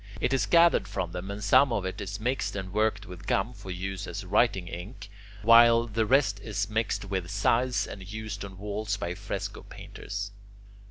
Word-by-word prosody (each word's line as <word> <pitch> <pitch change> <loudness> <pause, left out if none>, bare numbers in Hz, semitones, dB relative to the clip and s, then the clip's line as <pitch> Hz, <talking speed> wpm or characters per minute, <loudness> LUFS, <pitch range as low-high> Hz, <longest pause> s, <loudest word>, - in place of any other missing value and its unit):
It 125 - 0
is 135 - +1
gathered 170 0 +5
from 85 - -3
them, 90 +2 -6
and 100 +1 -5
some 125 +6 +5
of 105 -5 -1
it 95 +3 -4
is 100 +1 -5
mixed 115 -2 -1
and 95 -1 -5
worked 105 -1 +1
with 90 -1 -11
gum 110 +6 +1
for 95 - -11
use 95 +1 -4
as 100 -1 -6
writing 100 -1 +2
ink, 100 +5 -8 0.3
while 115 +1 +7
the 110 -1 -1
rest 130 -6 +3
is 105 0 -3
mixed 110 -2 -1
with 95 -3 -3
size, 115 +3 +1
and 95 0 -9
used 110 -2 -5
on 95 -1 -9
walls 105 0 -3
by 90 -3 -3
fresco - - -5
painters. 100 +1 -7
105 Hz, 185 wpm, -28 LUFS, 95-115 Hz, 0.3 s, while